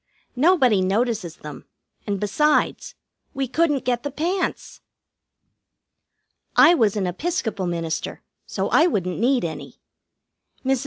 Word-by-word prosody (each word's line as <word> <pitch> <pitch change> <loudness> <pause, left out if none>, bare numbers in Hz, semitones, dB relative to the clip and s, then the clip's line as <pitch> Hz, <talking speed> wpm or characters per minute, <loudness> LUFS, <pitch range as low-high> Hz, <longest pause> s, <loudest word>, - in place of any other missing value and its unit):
Nobody 260 - +4
notices 200 -3 -1
them, 150 -1 -11 0.4
and, 200 -1 -1
besides, 295 +10 0 0.4
we 270 -1 -1
couldn't 295 0 0
get 245 -1 0
the 285 - -4
pants. 345 +7 -3 1.7
I 335 - +7
was 220 - +2
an 200 -3 -1
Episcopal 210 - -2
minister, 165 -2 -4 0.2
so - - -2
I 330 - +4
wouldn't 185 - -2
need 245 -2 +2
any. 160 - -7 0.9
Mrs. 265 -1 +2
240 Hz, 115 wpm, -22 LUFS, 190-295 Hz, 1.7 s, I